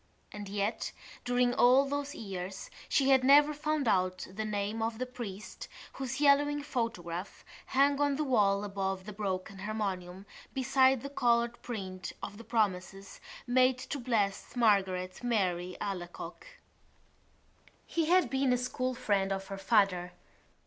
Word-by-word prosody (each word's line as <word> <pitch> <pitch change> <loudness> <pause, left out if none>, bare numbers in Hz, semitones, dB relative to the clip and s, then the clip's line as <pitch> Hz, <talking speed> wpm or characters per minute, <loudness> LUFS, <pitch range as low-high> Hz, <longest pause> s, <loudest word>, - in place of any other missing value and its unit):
And 205 -1 -7
yet 205 +2 -2 0.3
during 245 0 +2
all 255 +3 +5
those 285 +1 -3
years 190 -2 -6 0.2
she 275 -1 +3
had 265 -1 +5
never 290 +3 +6
found 300 -2 -1
out 185 -2 +1
the 220 +2 -3
name 210 +1 -2
of 225 0 -1
the 255 - -2
priest 230 -5 -8 0.3
whose 265 0 -4
yellowing 290 0 +4
photograph 200 - -4 0.2
hung 280 +1 +3
on 285 -1 +2
the 305 - -1
wall 205 -7 +2
above 195 -2 -3
the 210 - -7
broken 195 -1 -4
harmonium 195 -3 -4 0.3
beside 265 -1 +3
the 280 - -5
coloured 235 -3 +1
print 185 -6 -6
of 205 - -6
the - - -9
promises 195 -4 -2 0.2
made 255 0 +3
to 280 - -5
Blessed 230 -1 -1
Margaret 190 -4 +2
Mary 185 -6 0
Alacoque. 180 -3 -6 1.4
He 330 -1 0
had 365 +2 +4
been 265 -1 +2
a - - +2
school 255 +1 -2
friend 200 -5 0
of 195 0 -3
her 195 - -5
father. 195 -3 +2
220 Hz, 140 wpm, -31 LUFS, 195-260 Hz, 1.4 s, never